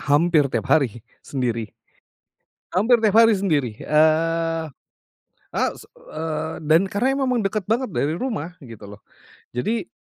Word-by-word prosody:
hampir 150 0 +3
tiap 115 -5 -2
hari 120 -6 +1 0.2
sendiri 120 -5 -3 1.0
hampir 225 +6 +4
tiap 215 -2 +2
hari 225 -1 +5
sendiri, 150 - 0
eee, 165 +2 +2 0.9
a - - 0
s - - -13
eee, 160 0 -5
dan 160 +5 +3
karena 260 +8 0
memang 245 -3 +1
deket 195 0 -2
banget 230 +1 0
dari 155 -1 -1
rumah 180 - -4
gitu, 115 -5 -11
loh. 105 - -25 0.5
Jadi, 220 - -1
165 Hz, 130 wpm, -22 LUFS, 145-210 Hz, 1.0 s, hari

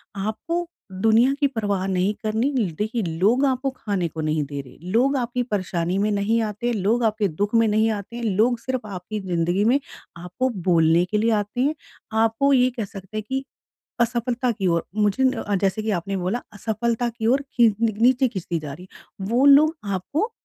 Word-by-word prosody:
आपको 220 - -3 0.2
दुनिया 225 +7 +3
की 285 - +4
परवाह 205 -7 -2
नहीं 190 +2 +1
करनी। 220 +6 0
ल 200 -8 0
देखिए, 220 +3 -1
लोग 195 - +2
आपको 265 0 0
ख़ाने 200 -8 -2
को 160 0 -6
नहीं 155 0 0
दे 140 0 -5
रहे, 130 - -16
लोग 255 +6 +3
आपकी 245 0 -1
परेशानी 185 -5 -2
में 210 +2 +1
नहीं 205 +3 +1
आते। 220 +3 -2
लोग 220 +4 +1
आपके 215 -2 +1
दुख 200 +6 -2
में 230 0 +5
नहीं 215 +1 +2
आते 205 +2 -6
हैं 240 - -5
लोग 225 +4 +2
सिर्फ़ 255 -3 -4
आपकी 200 +2 -5
ज़िंदगी 175 +2 +1
में 250 +5 +4 0.4
आपको 180 +10 -2 0.2
बोलने 165 -1 +4
के 210 +4 -1
लिए 225 +2 +2
आते 210 +3 -1
हैं। 295 +3 +1 0.5
आपको 225 +6 +2
ये 255 -1 +4
कह 225 - -1
सकते 195 +2 -9
हैं 215 - -2
कि 265 0 -1 0.6
असफ़लता 240 +1 0
की 195 -4 -2
ओर 170 -1 +1
मुझे 210 +4 +1
न 260 - +4
अ, 205 - -1
जैसे 195 +2 0
कि 215 - -1
आपने 195 +1 -2
बोला 190 +7 -2
असफ़लता 230 +3 -1
की 225 -1 -3
ओर 265 +4 +3
खींच 230 -4 +4
नी 225 -1 +2
नीचे 255 +2 +4
खींचती 175 -6 -3
जा 145 -2 -7
रही 180 +4 -11
है। 190 - -11
वो 255 +4 +3
लोग 300 +3 +6 0.2
आपको 295 - -2
215 Hz, 200 wpm, -23 LUFS, 190-245 Hz, 0.6 s, लोग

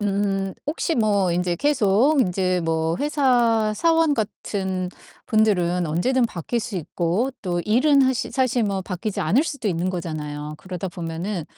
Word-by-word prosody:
음 195 -1 -1
혹시 320 +2 -1
뭐 205 - +2
인제 175 0 0
계속 275 0 +3
인제 185 -3 +1
뭐 160 +1 0
회사 245 -7 +2
사원 325 +1 +3
같은 190 -5 -3 0.4
분들은 180 -5 +2
언제든 235 +12 +1
바뀔 225 +4 -3
수 230 -3 -5
있고 180 - -1
또 175 -3 -1
일은 275 +6 +4
하시 260 -2 0
사실 255 -2 +1
뭐 200 -2 -1
바뀌지 190 +2 -4
않을 210 - +3
수도 280 -9 -3
있는 180 +1 -1
거잖아요. 150 -4 -5
그러다 185 +3 -6
보면은 170 +1 -4
195 Hz, 285 characters per minute, -23 LUFS, 175-245 Hz, 0.4 s, 일은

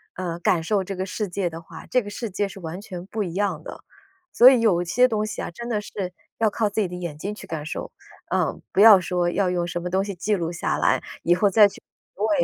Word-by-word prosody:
呃， 175 -2 -4
感 175 -1 +2
受 195 +4 0
这 195 - -5
个 185 +1 -3
世 205 +2 -3
界 180 0 -1
的 165 0 -8
话， 160 0 -12
这 250 - +3
个 205 - -8
世 225 +2 -5
界 200 +2 -1
是 195 - -10
完 170 0 -6
全 185 -4 -8
不 215 +1 -2
一 175 -4 -5
样 190 -5 -1
的。” - - -9 0.5
所 245 - +9
以 255 -3 +4
有 185 -6 +3
些 250 +9 +3
东 215 -3 -1
西 215 - -5
啊， - - -4
真 235 +7 -8
的 220 -3 0
是 190 -3 -5 0.3
要 225 -1 +3
靠 210 0 0
自 210 +2 -1
己 200 - 0
的 180 - -7
眼 170 -4 -5
睛 200 +7 -4
去 - - -11
感 155 -2 -5
受， 155 - -5 0.4
呃， - - 0
不 - - 0
要 210 -3 +10
说 180 -1 0
要 185 +1 +1
用 175 -1 -1
什 175 0 -4
么 180 - -4
东 190 +2 +1
西 200 -1 -5
记 195 +5 0
录 170 -3 -2
下 170 - -2
来， - - +2 0.2
以 175 - +4
后 200 +3 +3
再 205 +1 +7
去 - - -14 0.3
回 220 +9 +1
190 Hz, 285 characters per minute, -24 LUFS, 175-210 Hz, 0.5 s, 要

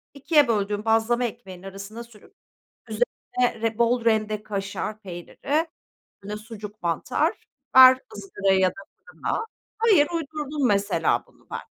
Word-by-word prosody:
2'ye 290 -1 +3
böldüğüm 210 -1 -1
bazlama 225 +2 +2
ekmeğinin 195 -6 -8
arasına 195 +4 -8
sürüp 230 -3 -19 0.6
üzerine 250 - -1
re 225 0 -1
bol 235 0 +2
rende 215 -1 +1
kaşar 205 +1 -4
peyniri, 210 - -3 0.6
böyle, 210 +1 -5
sucuk, 215 -1 -10
mantar 170 -1 -1 0.3
ver 260 0 +10 0.2
ızgaraya 195 - 0
ya 185 -1 +4
da - - -12 0.3
fırına. 455 -1 -3 0.3
Hayır, 415 -10 +4
uydurdum 300 -3 -2
mesela 200 -1 +1
bunu - - -26
ben. - - -3
225 Hz, 130 wpm, -24 LUFS, 205-260 Hz, 0.6 s, ver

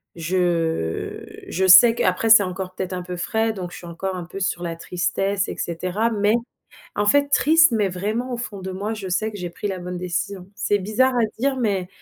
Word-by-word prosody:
je 165 - -1 0.2
je 190 +2 0
sais 210 +6 +9
qu'après 185 +2 +1
c'est 220 -2 +8
encore 185 0 -5
peut-être 185 0 -4
un 180 - -3
peu 180 0 -6
frais 220 +5 0
donc 180 -4 -6
je - - -9
suis 175 - -10
encore 190 +3 -4
un 180 -2 -6
peu 185 +3 -8
sur 185 -2 -1
la 170 -1 -3
tristesse 195 +3 -1
et - - -6
cetera. 185 +7 -2
Mais, 210 0 +2 0.6
en 205 - 0
fait 285 +7 +3
triste 320 +2 +5
mais 210 -3 +2
vraiment 215 +7 -3
au - - -3
fond 220 -4 -6
de 190 0 -5
moi 200 +4 -3
je 205 -3 -6
sais 215 +5 0
que 205 - -8
j'ai 180 -2 -5
pris 170 - -5
la 190 -1 -4
bonne 180 0 -5
décision. 180 +1 -4
C'est 205 0 0
bizarre 220 +7 +1
à 240 - +3 0.2
dire, 275 +2 +1
mais 200 -7 -1
190 Hz, 220 wpm, -22 LUFS, 180-220 Hz, 0.6 s, sais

